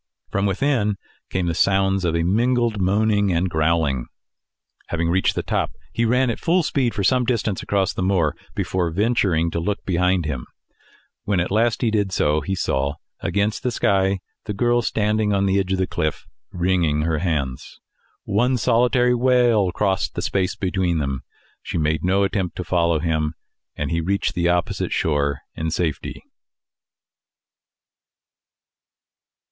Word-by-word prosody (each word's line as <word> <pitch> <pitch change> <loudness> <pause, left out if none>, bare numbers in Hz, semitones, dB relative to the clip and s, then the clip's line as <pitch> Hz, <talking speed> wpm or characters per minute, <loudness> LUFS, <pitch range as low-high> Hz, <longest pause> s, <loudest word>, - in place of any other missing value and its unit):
From 100 0 +1
within 105 0 +1 0.3
came 95 -1 -1
the 85 - 0
sounds 95 +2 +2
of 85 -1 +1
a 85 - +1
mingled 115 +3 +1
moaning 100 +1 +2
and 85 +2 +1
growling. 80 -5 0 0.8
Having 85 -1 -1
reached 95 +2 +2
the - - -2
top, - - -1 0.2
he 115 - +1
ran 125 +2 +2
at - - -5
full 175 +1 +2
speed 130 -6 0
for 100 - -1
some 125 +5 +3
distance 115 -5 -1
across 100 -2 0
the - - -4
moor 90 -5 +1 0.2
before 90 -2 -1
venturing 90 -4 +1
to 85 - -2
look 100 +5 -3
behind 90 -1 +1
him. 70 -5 -4 0.8
When 100 -3 +1
at 85 - -1
length 115 +2 +2
he 115 -3 +2
did 105 -3 0
so, 75 -3 +1
he 95 +5 -2
saw, 70 -4 -1 0.2
against 105 +1 -1
the 125 - 0
sky, 95 -4 +1 0.2
the 105 - -4
girl 120 +2 +2
standing 105 -1 0
on 100 0 +2
the 95 0 +2
edge 95 -1 -2
of - - +1
the 95 - +1
cliff, 80 -4 -3 0.3
wringing 85 -4 +1
her 80 -1 0
hands. 70 -7 -3 0.4
One 125 +6 +1
solitary 125 +3 +3
wail 120 -6 +3
crossed 95 0 -1
the - - -3
space 95 -2 0
between. 85 -8 -1 0.4
She - - -4
made 80 -1 0
no 95 +2 +2
attempt 95 -3 -1
to 90 - -4
follow 85 -2 +1
him, 80 -1 -1 0.4
and - - -3
he 85 0 0
reached 100 +4 -1
the 85 -2 +1
opposite 90 -1 0
shore 70 -3 0
in 80 0 -3
safety. 80 -2 -3
95 Hz, 155 wpm, -22 LUFS, 85-105 Hz, 0.8 s, some